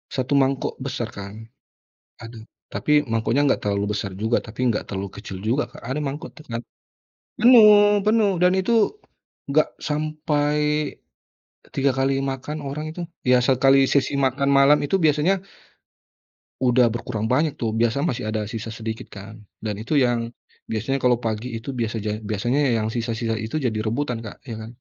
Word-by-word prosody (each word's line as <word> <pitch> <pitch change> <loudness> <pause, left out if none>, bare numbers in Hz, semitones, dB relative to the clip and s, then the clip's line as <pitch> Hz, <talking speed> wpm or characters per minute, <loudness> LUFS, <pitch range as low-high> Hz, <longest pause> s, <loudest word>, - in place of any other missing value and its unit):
1 135 +2 +1
mangkok 135 -1 0
besar 130 -3 -4
kan, 105 +3 -9 0.7
aduh, 115 0 -9 0.3
tapi 150 0 +2
mangkoknya 115 +3 0
nggak - - 0
terlalu 100 +1 0
besar 100 -2 -3
juga, 110 +4 +1
tapi 120 +2 -1
nggak 105 - -3
terlalu 95 -1 -5
kecil 95 -2 -7
juga, 125 +7 0
Kak. - - -14
Ada 130 +5 -3
mangkok 145 +1 -5
tuh 155 - -15
kan, 115 0 -4 0.8
penuh 210 -4 +7
penuh, 210 -3 +3
dan 180 +1 +3
itu 225 +3 +2 0.6
nggak 155 +2 +4
sampai, 150 -1 -1 1.2
3 135 0 +2
kali 135 +1 0
makan 135 +3 -4
orang 150 +3 -5
itu 175 - -5 0.2
ya, 125 0 +5
sekali 135 +1 +4
sesi 140 0 +2
makan 135 +1 +1
malam 140 +1 +6
itu 195 - +1
biasanya, 160 +5 +2 1.2
udah 125 -1 +4
berkurang 110 -2 -3
banyak 150 +3 +2
tuh, 115 -2 -1
biasa 120 +4 +1
masih 125 -8 -2
ada 110 -1 -2
sisa 115 -1 -5
sedikit 110 +1 -6
kan, 110 +2 -10 0.2
dan 105 -2 -3
itu 115 +8 -3
yang, 120 -2 +1 0.4
biasanya 115 +5 -1
kalau 125 -2 +3
pagi 115 +2 -3
itu 115 - -7
biasaja 110 -2 -3
biasanya 120 +7 0 0.2
yang 110 0 -1
sisa-sisa 115 -1 -2
itu 110 +8 -3
jadi 110 -4 -1
rebutan, 125 +1 -1
Kak, 110 - -10
ya 115 -2 -6
kan. 110 0 -8
125 Hz, 160 wpm, -23 LUFS, 110-145 Hz, 1.2 s, penuh